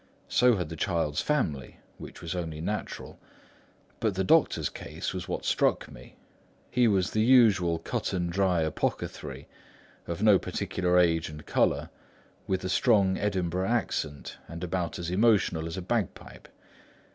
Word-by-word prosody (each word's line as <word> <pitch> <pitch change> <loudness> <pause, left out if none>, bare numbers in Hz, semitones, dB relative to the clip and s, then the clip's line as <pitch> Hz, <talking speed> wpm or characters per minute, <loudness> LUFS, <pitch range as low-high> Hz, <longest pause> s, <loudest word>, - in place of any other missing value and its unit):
So 125 -1 +4
had 90 -4 -3
the 80 - -6
child's 80 -4 -1
family, 75 - -1 0.2
which - - -10
was 85 - -3
only 80 -4 -4
natural. 105 +6 -5 0.8
But 110 -4 0
the 95 - 0
doctor's 95 - +3
case - - -6
was - - -5
what - - -4
struck - - +1
me. - - -14 0.6
He 125 -1 +3
was 95 -3 +1
the 110 - +1
usual 110 -9 +5
cut - - -3
and 90 -2 -1
dry 90 -2 +2
apothecary, 80 -1 -3 0.6
of 85 +4 -3
no 105 -4 +6
particular 90 0 -1
age 85 -3 +3
and 75 0 -10
colour, - - +1 0.6
with 95 -1 -1
a - - -2
strong 95 0 +3
Edinburgh 95 -2 -1
accent 80 - -2
and 85 +1 -8
about 90 -1 -2
as 85 0 -4
emotional 100 -5 +2
as 85 +2 -6
a 95 - -4
bagpipe. 105 0 -3
90 Hz, 150 wpm, -28 LUFS, 85-105 Hz, 0.8 s, no